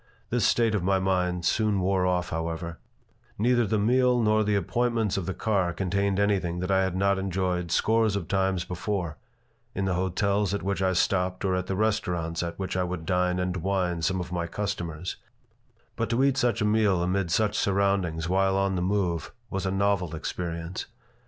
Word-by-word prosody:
This - - +2
state 115 -2 +2
of 105 - +1
my 95 +2 +2
mind 90 -2 0
soon 105 0 +2
wore 95 0 +1
off, 90 -1 0
however 80 +1 -4 0.6
Neither 120 +1 +2
the 110 +2 +1
meal 125 +3 +3
nor 110 -1 +3
the 105 0 +1
appointments 115 +2 0
of 95 -3 -2
the 95 - -1
car 95 -6 0
contained 100 +2 0
anything 95 -4 +1
that 90 +2 -2
I 95 0 +4
had 95 -1 -1
not 100 +1 +2
enjoyed 90 -2 -1
scores 110 +4 +2
of 95 -5 -3
times 95 -2 0
before 90 -3 -3 0.6
in 100 - -1
the 95 - 0
hotels 100 +2 0
at - - -4
which 100 0 -1
I 95 0 +2
stopped 90 +1 0
or 95 - +1
at 90 0 -2
the 95 - -1
restaurants 90 -6 -1
at 85 -1 -4
which 95 -1 -3
I 90 - +1
would 90 -2 -4
dine 90 0 +1
and 90 0 -1
wine 90 -2 -1
some 95 +3 0
of 90 0 -5
my 85 -1 -2
customers; 90 -3 -4 0.8
but 115 -2 -2
to 120 +3 +2
eat 140 -1 +3
such 120 -1 +1
a - - +2
meal 105 -4 +2
amid 90 0 0
such 105 +5 +1
surroundings 95 -6 +1
while 95 +1 +2
on 95 0 +1
the 90 - -1
move 90 -3 -1 0.2
was 95 -1 -2
a - - 0
novel 95 -4 0
experience. 85 +1 -4
95 Hz, 190 wpm, -27 LUFS, 90-100 Hz, 0.8 s, I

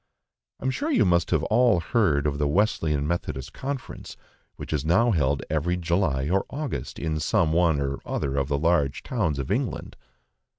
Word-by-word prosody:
I - - -8
am 130 - +2
sure 290 - -2
you 290 - +3
must 85 -2 +2
all 110 - +3
have 85 - -9
heard 80 -11 +2
of 70 -1 -1
the 75 - +1
Wesleyan 75 -5 +1
Methodist 70 -6 -3
Conference, 135 -1 -6 0.4
which - - -6
is 75 -3 -1
now 95 +10 +3
held 70 -6 +1
every 80 +3 0
July 85 -6 0
or 95 +4 +1
August 145 -2 -5
in 80 -1 -2
some 80 0 +1
one 85 -3 +3
or 70 0 -2
other 70 -2 -2
of 70 -1 0
the 70 0 0
large 75 -3 +1
towns 95 - -1
of 70 -2 -4
England. - - -2
80 Hz, 180 wpm, -25 LUFS, 70-100 Hz, 0.4 s, you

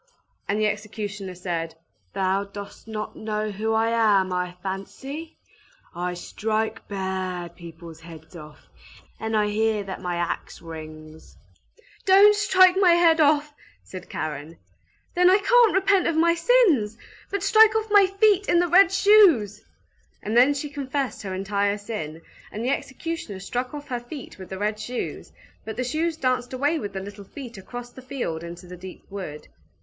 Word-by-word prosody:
And 205 +2 +1
the 215 - +2
executioner 205 -2 -4
said, 170 -2 -4 0.4
"Thou 195 +1 0
dost 200 +2 -10
not 215 -1 -5
know 215 0 -3
who 215 +3 -2
I 225 +1 +2
am, 205 -5 +3
I 180 0 -2
fancy? 270 +12 -6 0.6
I 180 +1 -3
strike 220 +4 -3
bad 185 -3 -4
people's 165 -1 -11
heads 165 0 -13
off; 150 -2 -12 0.6
and 220 0 -1
I 210 - +3
hear 215 0 0
that 195 -1 -7
my 180 -1 -2
axe 170 0 -3
rings!" 155 -1 -11 0.7
"Don't 400 +2 +7
strike 375 -3 +5
my 360 -3 +6
head 335 -1 +4
off!" 295 0 +3 0.3
said 185 - -10
Karen. 155 +1 -5 0.6
"Then 360 +1 +5
I 375 - +6
can't 470 +1 +4
repent 385 -1 +3
of 335 - 0
my 335 +1 +4
sins! 335 - +3 0.3
But 400 - -3
strike 440 -1 +6
off 440 -1 -1
my 405 -2 +7
feet 405 0 +2
in 345 - +4
the 350 +1 +3
red 360 +1 +6
shoes!" 360 - +5 0.6
And 215 +2 -2
then 260 +4 +5
she 285 +1 -4
confessed 280 -1 -3
her 190 -2 -5
entire 200 +1 0
sin, 165 -7 -6 0.3
and 220 +3 -4
the 260 - +1
executioner 275 - -4
struck 245 +6 -3
off 290 0 -9
her 245 -2 -2
feet 240 -2 -10
with 185 - -9
the 190 - -5
red 210 +2 -2
shoes, 240 +3 -5 0.3
but 220 - -7
the 250 - 0
shoes 315 +6 -1
danced 255 -3 -1
away 290 +5 +1
with 205 -7 -6
the 190 - -4
little 200 +1 -9
feet 245 +2 -9
across 245 +5 -8
the 260 - -12
field 240 -11 -4
into 170 +1 -9
the 180 0 -9
deep 185 +1 -11
wood. 185 -7 -7
220 Hz, 165 wpm, -24 LUFS, 190-310 Hz, 0.7 s, Don't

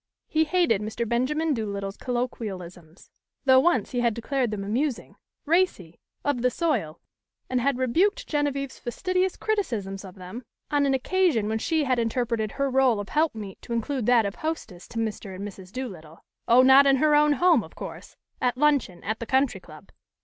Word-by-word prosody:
He 315 0 +2
hated 315 - +2
Mr. 220 +2 -3
Benjamin 295 +7 0
Doolittle's 200 -4 -4
colloquialisms, 190 -9 -5 0.3
though 260 -1 +7
once 260 - +2
he 250 - -1
had 235 -3 +1
declared 250 +1 -1
them 210 -2 -4
amusing, 245 +6 -2 0.3
racy, 300 - 0 0.3
of 285 -4 0
the 250 - +3
soil, 245 - -1 0.5
and 255 -1 +1
had 275 0 +1
rebuked 330 - +1
Genevieve's 280 -3 -2
fastidious 370 +8 -1
criticisms 225 - -2
of 185 -2 -11
them 185 +5 -8 0.3
on 290 -1 +2
an 270 - +2
occasion 305 - +1
when 220 +1 -1
she 320 +5 +1
had 255 -3 +1
interpreted 230 -2 -1
her 275 -1 -1
rôle 260 -4 +3
of 205 - -6
helpmeet 225 - -1
to 235 - -6
include 235 +1 -2
that 240 -3 +5
of 200 - -2
hostess 305 - -5
to - - -9
Mr. 215 -3 -3
and 200 +2 -5
Mrs. 190 -2 -11
Doolittle 180 -11 -8 0.2
oh, 245 +2 +6
not 265 +2 +7
in 275 - +5
her 300 +3 +3
own 295 0 +5
home, 320 -2 +4
of - - -14
course! - - -9 0.3
at 250 0 +1
luncheon, 280 -11 +1
at 220 +3 -3
the 230 - -6
Country 265 0 +1
Club! - - -15
250 Hz, 180 wpm, -26 LUFS, 210-290 Hz, 0.5 s, though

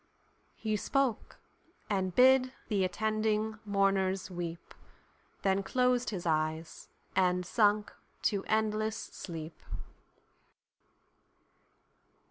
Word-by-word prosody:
He 215 -1 -1
spoke, 265 0 -1 0.5
and 190 -3 -1
bid 255 0 +6 0.2
the 200 -4 +2
attending 215 +3 0
mourners 195 -2 +1
weep:Then 175 +2 -5
closed 250 +4 +1
his 185 -5 -5
eyes, 160 0 -1 0.3
and 180 -1 +2
sunk 210 +1 +2 0.3
to 200 -3 +1
endless 215 0 0
sleep! 165 -2 -7
200 Hz, 80 wpm, -31 LUFS, 185-220 Hz, 0.5 s, bid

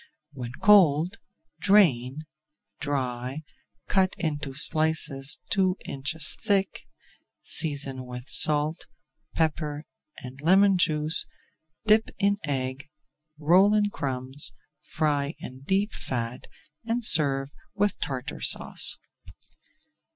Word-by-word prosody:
When 125 -3 -8
cold, 180 -2 +4 0.4
drain, 155 - +2 0.6
dry, 130 0 -4 0.4
cut 190 -1 +1
into 150 -4 -4
slices 155 -2 +3
two 190 -1 +1
inches 145 +3 -2
thick, 200 -3 -1 0.6
season 135 -5 -2
with 125 +1 -9
salt, 150 +3 +3 0.5
pepper, 155 -2 -2 0.4
and 130 +2 -10
lemon 190 +3 +3
juice, 155 -2 +1 0.6
dip 215 +1 +3
in 200 0 +1
egg, 135 0 -4 0.5
roll 185 +7 +3
in 205 -1 +1
crumbs, 130 -1 +1 0.3
fry 145 -1 -2
in 130 +1 -10
deep 200 +5 0
fat, 120 -1 -5 0.4
and 230 0 -1
serve 140 -5 +3 0.2
with 205 -1 -1
Tartar 125 - -6
Sauce. - - +2
150 Hz, 95 wpm, -25 LUFS, 135-185 Hz, 0.6 s, cold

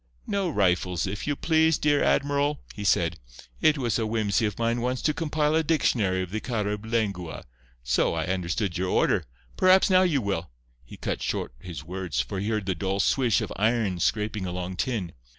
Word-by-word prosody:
"No 195 -3 -1
rifles, 90 - +1
if 100 +6 -5
you 145 - +1
please, 160 +1 +3
dear 145 -1 +2
admiral," 145 +1 +1
he 105 - -6
said. 85 -3 +2 0.4
"It 155 -1 +4
was 120 -3 0
a 110 - 0
whimsey 110 -1 +1
of 105 - -5
mine 115 +1 0
once 125 +1 -1
to 150 - +2
compile 150 -1 0
a 160 - +3
dictionary 110 - +1
of 90 - -8
the 110 - -2
Carib 105 -2 -3
lengua. 100 -7 -2 0.4
So, 60 +5 +1
I 80 -1 -1
understood 90 +1 -2
your 95 0 -1
order. 90 -2 +2 0.3
Perhaps 190 +1 +5
now 185 0 +6
you 170 -7 +2
will—" 95 -7 -2 0.3
He - - -12
cut - - -3
short - - -2
his 80 -2 -8
words, 90 0 -4
for 100 - -2
he 100 +3 -2
heard 105 -3 -1
the 95 - 0
dull 95 +3 -2
"swish" 120 +1 +2
of - - -4
iron 110 -4 +1
scraping 105 +1 0
along 90 +1 -4
tin. 105 -9 -2
105 Hz, 190 wpm, -26 LUFS, 95-140 Hz, 0.4 s, now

